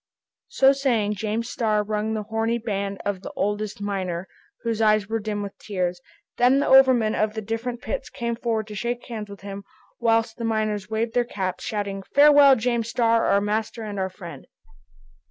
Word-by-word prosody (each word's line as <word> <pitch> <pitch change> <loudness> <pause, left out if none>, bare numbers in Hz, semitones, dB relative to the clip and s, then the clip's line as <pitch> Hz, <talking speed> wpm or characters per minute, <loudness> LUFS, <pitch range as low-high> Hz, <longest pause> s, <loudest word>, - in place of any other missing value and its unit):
So 270 - +5
saying, 240 -7 +1
James 220 +3 -2
Starr 215 -4 0
wrung 215 +1 -2
the 215 - -3
horny 225 +2 -1
hand 200 -2 -2
of 200 -2 -2
the - - -7
oldest 205 +1 -2
miner, 190 -3 -3 0.4
whose 230 -1 -1
eyes 215 -2 +3
were 225 +1 -1
dim 205 -1 -3
with 200 - -7
tears. 180 -3 -3 0.4
Then 250 +3 +5
the - - +1
overmen 260 -5 +5
of 215 0 0
the 220 - -3
different 230 +3 -4
pits - - -4
came 235 -3 -3
forward 230 -2 -1
to - - -7
shake 240 +4 -3
hands 215 -3 -6
with 200 - -11
him, 200 0 -7 0.4
whilst 225 -1 +1
the 235 - -5
miners 215 -3 -1
waved 225 +1 -1
their 245 - +3
caps, 190 -6 -4
shouting, 200 -3 -3
"Farewell, 285 -1 +8
James 235 -1 -1
Starr, 230 -1 +2
our 200 - +3
master 215 +2 -2
and 205 -2 -5
our 190 0 -1
friend!" 170 -7 -10
220 Hz, 185 wpm, -24 LUFS, 205-235 Hz, 0.4 s, Farewell